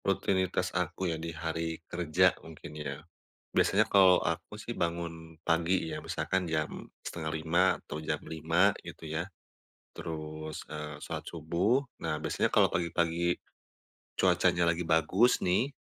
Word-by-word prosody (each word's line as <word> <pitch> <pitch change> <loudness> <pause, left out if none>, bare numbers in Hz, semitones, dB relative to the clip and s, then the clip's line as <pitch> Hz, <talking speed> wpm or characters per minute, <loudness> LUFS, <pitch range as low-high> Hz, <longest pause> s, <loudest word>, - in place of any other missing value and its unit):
Rutinitas 95 -1 +1
aku 90 0 -1
ya - - -3
di 85 - -4
hari 80 0 -3
kerja 85 -3 +3
mungkin 80 -1 -10
ya. 75 0 -6 0.5
Biasanya 110 +2 +4
kalau 95 -3 +6
aku - - -3
sih - - -6
bangun 85 -1 -3
pagi 85 +1 +1
ya, - - -5
misalkan 95 0 -1
jam 80 -2 0 0.3
4.30 80 +3 0
atau - - -7
jam 80 - -2
5.00 85 +5 +2
gitu 80 - -8
ya. 80 +2 -2 0.7
Terus, 80 -1 -6
eee, 75 0 -6
sholat - - -6
subuh 85 - +1 0.2
nah, 80 -2 -1
biasanya 75 - 0
kalau - - +4
pagi-pagi 85 0 +1 0.8
cuacanya 85 - +3
lagi 85 0 -3
bagus 90 +9 +4
nih, 110 +10 +2
85 Hz, 130 wpm, -31 LUFS, 80-90 Hz, 0.8 s, kalau